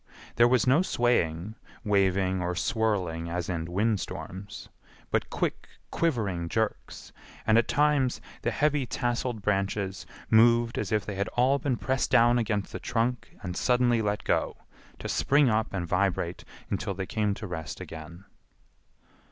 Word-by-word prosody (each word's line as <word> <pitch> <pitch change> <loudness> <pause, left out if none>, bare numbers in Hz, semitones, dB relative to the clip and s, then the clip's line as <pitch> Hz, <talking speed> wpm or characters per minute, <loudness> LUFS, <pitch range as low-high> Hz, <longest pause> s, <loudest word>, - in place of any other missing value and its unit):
There 120 - +7
was 125 -2 +3
no 135 +6 +5
swaying, 110 - 0 0.3
waving 95 -2 +2
or 90 0 -2
swirling 90 -6 -1
as 85 0 -3
in 85 -3 -2
wind 105 +3 +1
storms, 100 +3 -7 0.4
but - - 0
quick, - - -2 0.2
quivering 100 - -1
jerks, 110 +1 -3 0.3
and 110 - +4
at 115 0 +4
times 140 -1 +2 0.2
the - - 0
heavy 150 -3 +1
tasseled 120 -2 -2
branches 100 -1 -1 0.2
moved 115 +1 +4
as 105 - -3
if 105 -3 +1
they 105 - -4
had 100 +1 -2
all 130 +3 +4
been 130 -2 -1
pressed 130 -1 0
down 120 +1 +5
against 105 -4 -1
the - - -5
trunk 120 +1 -2
and 90 -2 -4
suddenly 125 0 +2
let 105 -1 -1
go, - - 0 0.4
to - - -6
spring 140 -1 +3
up 110 0 0
and 95 -3 -2
vibrate 90 -2 0 0.3
until 100 0 -2
they 95 0 -3
came 105 0 -1
to 105 - -7
rest 80 -5 -6
again. 80 +4 -9
105 Hz, 150 wpm, -28 LUFS, 95-120 Hz, 0.4 s, There